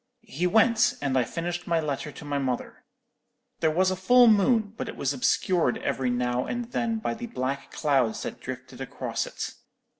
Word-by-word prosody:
He 175 +6 +1
went, 220 +3 +4
and 140 -2 -1
I 130 - +4
finished 175 +6 -4
my 170 -1 +2
letter 150 -1 -3
to 150 - -11
my 145 -1 -1
mother. 130 -3 -3 0.7
There 160 - +3
was 185 +4 +2
a - - 0
full 245 +7 +6
moon, 215 -1 +4
but - - -5
it - - -7
was 140 0 -1
obscured 150 +2 +1
every 130 -2 0
now 125 0 0
and 240 -1 -4
then 230 -1 0
by 220 - -2
the 235 +1 -6
black 140 - -3
clouds 135 -7 +1
that - - -6
drifted 130 0 -8
across 135 - -3
it. - - -5
160 Hz, 185 wpm, -26 LUFS, 130-215 Hz, 0.7 s, full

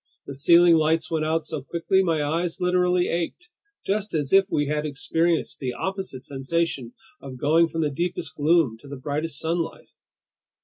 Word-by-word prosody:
The 140 - -7
ceiling 170 +4 +5
lights 160 +1 +1
went 155 -1 0
out 160 0 0
so 155 -2 -5
quickly, 170 +6 +1
my 165 -5 +1
eyes 165 +3 -2
literally 180 0 +2
ached, 175 - -3 0.3
just 205 -1 -1
as 145 -1 -1
if 195 0 +6
we 145 - +1
had 150 +1 -1
experienced 165 +3 -1
the 130 -3 -3
opposite 190 -6 -5
sensation 135 -2 -2 0.3
of 130 -2 -8
going 160 +5 +3
from 165 0 -3
the 150 -2 0
deepest 175 +5 -3
gloom 150 -6 +2
to 140 - -15
the 140 0 -7
brightest 145 +2 -3
sunlight. 165 +2 -3
160 Hz, 170 wpm, -24 LUFS, 145-175 Hz, 0.3 s, if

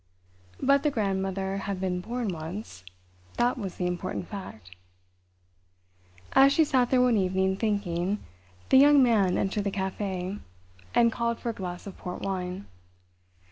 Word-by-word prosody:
But 280 +1 +4
the 300 - +2
grandmother 195 -4 -1
had 200 -1 -4
been 180 -1 -1
born 235 +2 -3
once—that 95 - -5
was 195 -7 -5
the 180 - -2
important 180 0 -3
fact. 150 - -9 1.6
As 270 +1 +7
she 320 +3 +4
sat 255 -4 +2
there 255 -1 +4
one 245 -3 +3
evening, 190 0 +1
thinking, 200 -3 -1 0.5
the - - +6
Young 285 0 +7
Man 210 -7 +3
entered 200 +1 -1
the - - +1
café, 190 0 -3 0.6
and 235 -1 +5
called 235 0 -1
for 240 - -3
a - - -2
glass 180 -3 -6
of 200 - -9
port 180 0 -6
wine. 185 0 -3
195 Hz, 140 wpm, -27 LUFS, 180-235 Hz, 1.6 s, As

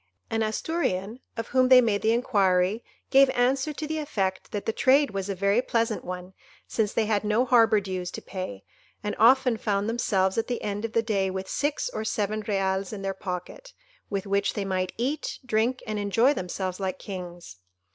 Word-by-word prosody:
An 225 - 0
Asturian, 220 - -1 0.2
of 230 - -4
whom 255 0 +3
they 255 -1 +9
made 220 -4 +2
the 220 - +3
inquiry, 200 -3 +2 0.3
gave 270 0 +7
answer 265 +4 +2
to 305 - -5
the 315 +1 -2
effect 195 -11 -2
that 205 - -4
the 225 - 0
trade 275 +4 +4
was 195 0 -4
a 195 - -1
very 200 +5 +2
pleasant 230 -3 -1
one, 180 +1 -7 0.3
since 215 -2 0
they 225 - +1
had 210 -1 +1
no 215 +4 +2
harbour 230 -3 +5
dues 185 -2 -4
to - - -5
pay, 185 - -6 0.4
and 210 - -2
often 250 +1 +5
found 205 -2 -1
themselves 195 -4 +1
at 225 - -2
the 245 -1 -3
end 205 +1 -2
of 225 - -5
the 230 - +2
day 200 -4 0
with 190 0 -4
six 290 - -1
or 220 - -4
seven 215 0 -1
reals 195 -2 0
in 205 -3 -6
their 195 0 -1
pocket, 185 - -7 0.4
with 200 -1 -2
which 200 0 0
they 205 - -2
might 185 -1 -1
eat, 265 +6 -2
drink, 240 +2 0
and 215 -2 -3
enjoy 225 +7 +3
themselves 185 -3 -4
like 190 -1 -2
kings. 175 - -8
210 Hz, 195 wpm, -26 LUFS, 190-240 Hz, 0.4 s, they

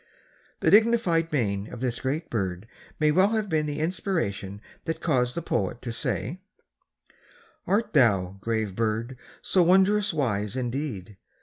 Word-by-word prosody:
The - - +3
dignified 205 -7 +4
mien 100 -8 -1
of - - -8
this 125 -1 -2
great 150 +5 -3
bird 95 -2 -2 0.3
may 150 -1 +4
well 190 +7 +3
have 215 -2 -1
been 155 -2 +1
the 145 -1 -3
inspiration 155 - -2 0.3
that 160 0 -2
caused 125 -7 +1
the 170 - -3
poet 110 - -1
to 120 -2 -4
say, 120 - -3 1.3
Art 210 +4 +1
thou, 100 - +3
grave 110 -3 -2
bird! 115 +3 -1 0.3
so 185 - +3
wondrous 190 +3 +4
wise 105 - -1
indeed? 120 -6 -4
130 Hz, 140 wpm, -26 LUFS, 105-170 Hz, 1.3 s, dignified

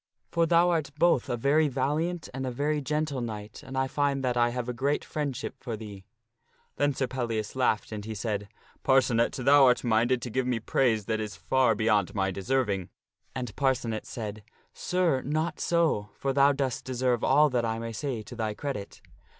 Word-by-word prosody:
For 170 -1 +2
thou 170 +2 +4
art 160 -5 0
both 170 -6 +3
a 120 - -1
very 145 +6 +3
valiant 150 +6 -1
and 130 0 -3
a - - 0
very 145 +4 -1
gentle 150 -1 -1
knight, 105 -2 -6
and 130 - -7
I 130 0 +1
find 140 0 0
that 125 -1 0
I 120 0 +3
have 125 0 -4
a 125 - -2
great 140 +4 -1
friend 145 -4 -3
ship - - -5
for 115 -4 -5
thee." 100 -3 -9 0.7
Then 145 -1 +1
Sir 130 - 0
Pellias 115 -4 -3
laughed, 125 -5 +1
and 105 -1 -5
he 110 +1 -5
said, 105 -1 -3 0.2
" - - -31
Parcenet, 125 -3 +3
thou 135 +2 +5
art 125 -1 +3
minded 120 +2 +2
to 120 - -5
give 130 +2 0
me 125 -2 0
praise 110 -2 +1
that 110 0 -1
is 105 -2 -4
far 130 -4 +2
beyond 105 -3 +1
my 95 0 +1
deserving." 100 -2 -1 0.5
And 125 -6 -4
Parcenet 125 -5 0
said, 110 -2 -6 0.2
" - - -41
Sir, 180 -7 +1
not 155 +4 -2
so, 165 -12 +1
for 135 -1 -1
thou 140 +1 +5
dost 135 -3 -2
deserve 125 -2 0
all 150 +2 +5
that 120 -2 +1
I 115 -1 -1
may 115 0 -5
say 120 -1 -3
to 120 - -10
thy 110 -2 -2
credit." 135 -8 -6
125 Hz, 200 wpm, -28 LUFS, 110-140 Hz, 0.7 s, thou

